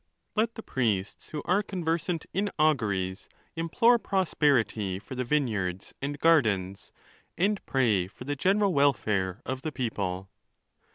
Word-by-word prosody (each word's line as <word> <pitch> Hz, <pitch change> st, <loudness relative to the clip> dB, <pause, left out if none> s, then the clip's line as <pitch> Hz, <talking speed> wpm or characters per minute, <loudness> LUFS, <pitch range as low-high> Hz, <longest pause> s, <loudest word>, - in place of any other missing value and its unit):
Let 225 Hz, +1 st, +1 dB
the 225 Hz, -, -7 dB
priests 105 Hz, -7 st, -1 dB
who 150 Hz, -2 st, -5 dB
are 185 Hz, +4 st, +3 dB
conversant 170 Hz, -3 st, -2 dB
in 200 Hz, +2 st, 0 dB
auguries 105 Hz, -11 st, +1 dB, 0.3 s
implore 230 Hz, +9 st, +3 dB
prosperity 140 Hz, -, +1 dB
for 105 Hz, -, -9 dB
the 125 Hz, 0 st, -2 dB
vineyards 110 Hz, -9 st, -1 dB
and 145 Hz, +1 st, -3 dB
gardens, 110 Hz, -, +2 dB, 0.5 s
and 200 Hz, +3 st, +1 dB
pray 110 Hz, -9 st, +2 dB
for 100 Hz, -, -12 dB
the 145 Hz, +3 st, -2 dB
general 195 Hz, +5 st, +2 dB
welfare 110 Hz, -, +1 dB
of 130 Hz, 0 st, -3 dB
the 155 Hz, -, -3 dB
people. 100 Hz, -8 st, -3 dB
135 Hz, 130 wpm, -28 LUFS, 100-165 Hz, 0.5 s, are